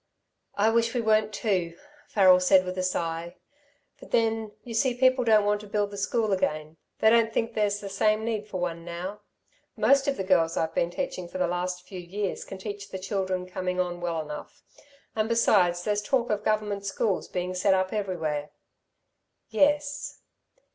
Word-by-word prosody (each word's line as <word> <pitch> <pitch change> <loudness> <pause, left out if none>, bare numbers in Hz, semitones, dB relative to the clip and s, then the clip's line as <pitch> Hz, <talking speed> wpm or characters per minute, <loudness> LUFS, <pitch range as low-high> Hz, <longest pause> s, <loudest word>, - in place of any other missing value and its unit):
"I 215 +2 +3
wish 230 +1 +1
we 245 - +1
weren't 215 -1 +2
too," 185 -6 -1 0.3
Farrel 185 -3 +6
said 185 0 +4
with 185 0 -4
a 185 - -1
sigh, 170 -1 -2 0.6
"but - - -13
then 225 -1 +1
you 235 - -8
see 250 +2 +2
people 255 0 +3
don't 215 -3 +4
want 205 0 +1
to 210 - -11
build 205 0 -1
the - - -7
school 220 +1 0
again. 155 -3 -2 0.2
They 220 - +4
don't 230 -1 +4
think 230 0 -1
there's 205 -1 0
the 200 - -6
same 215 +2 +1
need 215 -2 -2
for 185 - -5
one 170 -1 -3
now. 180 +4 -6 0.6
Most 270 +6 +4
of 280 - 0
the 195 - -2
girls 170 -3 +2
I've 160 0 0
been 170 - +1
teaching 185 -4 -4
for 180 - -7
the 180 - +2
last 180 +1 -3
few 185 - -7
years 190 +3 -4
can 195 - -8
teach 200 0 -7
the 190 - -5
children 190 -1 -2
coming 185 0 -3
on 175 -1 -2
well 170 -2 -1
enough. 150 -1 -9 0.5
And 220 0 0
besides, 180 -7 +3
there's 210 -1 0
talk 240 +2 0
of 210 0 -1
Government 210 -2 0
schools 200 0 -1
being 180 0 -3
set 190 +1 +3
up 185 +1 0
everywhere." 165 -8 -2 1.0
"Yes." 285 +4 +1
200 Hz, 185 wpm, -27 LUFS, 180-220 Hz, 1.0 s, Farrel